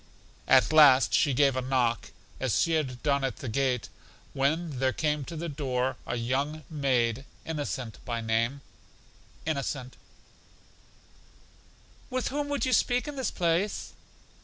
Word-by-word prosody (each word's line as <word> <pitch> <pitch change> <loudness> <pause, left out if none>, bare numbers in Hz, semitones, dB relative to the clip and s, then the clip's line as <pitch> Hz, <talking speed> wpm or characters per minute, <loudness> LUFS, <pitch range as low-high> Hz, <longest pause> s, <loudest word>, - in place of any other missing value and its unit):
At 130 +4 +5
last 145 -4 +7
she 145 - +4
gave 135 0 +3
a 130 - 0
knock, 125 -3 0 0.3
as - - +1
she 165 - +2
had 135 -6 -1
done 140 -2 +2
at 130 -4 -1
the - - -7
gate, 125 0 0 0.5
when 145 +1 0
there 130 -1 +2
came 150 0 0
to 165 - -7
the 165 +2 -4
door 130 -4 -1
a - - -2
young 135 +6 -2
maid, 130 -4 +1 0.2
Innocent 140 -7 -4
by 120 -2 -3
name. 115 +4 0 0.8
Innocent: 140 -4 -3 2.1
With 255 -1 -1
whom 290 +1 -2
would 285 -1 0
you 255 - +1
speak 245 +3 +2
in 295 - -5
this 265 -4 -1
place? 175 +4 -1
140 Hz, 140 wpm, -28 LUFS, 125-160 Hz, 2.1 s, last